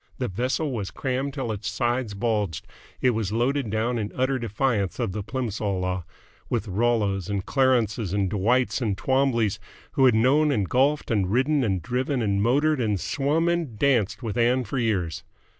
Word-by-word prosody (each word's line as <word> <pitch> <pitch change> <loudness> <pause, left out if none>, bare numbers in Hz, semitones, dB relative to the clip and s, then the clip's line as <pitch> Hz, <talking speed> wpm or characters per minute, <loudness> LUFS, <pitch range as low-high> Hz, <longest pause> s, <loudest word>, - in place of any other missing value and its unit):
The - - -2
vessel 130 - -1
was 105 -7 -3
crammed 135 +7 -3
till 130 -5 -2
its 105 -1 -4
sides 120 -3 -1
bulged, 105 -6 -1 0.4
it 130 - +4
was 110 -4 -2
loaded 125 +2 0
down 115 +3 0
in 105 -1 -3
utter 130 +1 +1
defiance 110 -3 -1
of 115 -6 -1
the 105 - -4
Plimsoll 105 -4 -2
law, 90 -1 -2 0.4
with 105 - -1
Rollos 100 -2 0
and 100 -2 -2
Clarences 120 -7 +1
and 100 -1 +1
Dwights 120 +8 +1
and 105 -5 -1
Twombleys 130 -5 +1 0.3
who 135 - +3
had 125 -3 +5
known 140 +7 +4
and 105 -8 0
golfed 140 +6 +1
and 100 -5 +1
ridden 135 +4 +2
and 95 -6 -1
driven 125 +1 -1
and 100 -2 +1
motored 140 +5 +2
and 105 -4 0
swum 150 - 0
and 170 -10 -1
danced 115 -6 +1
with 115 0 -2
Ann 125 +2 +3
for 135 +2 -3
years. 95 -8 -1
120 Hz, 175 wpm, -25 LUFS, 100-130 Hz, 0.4 s, had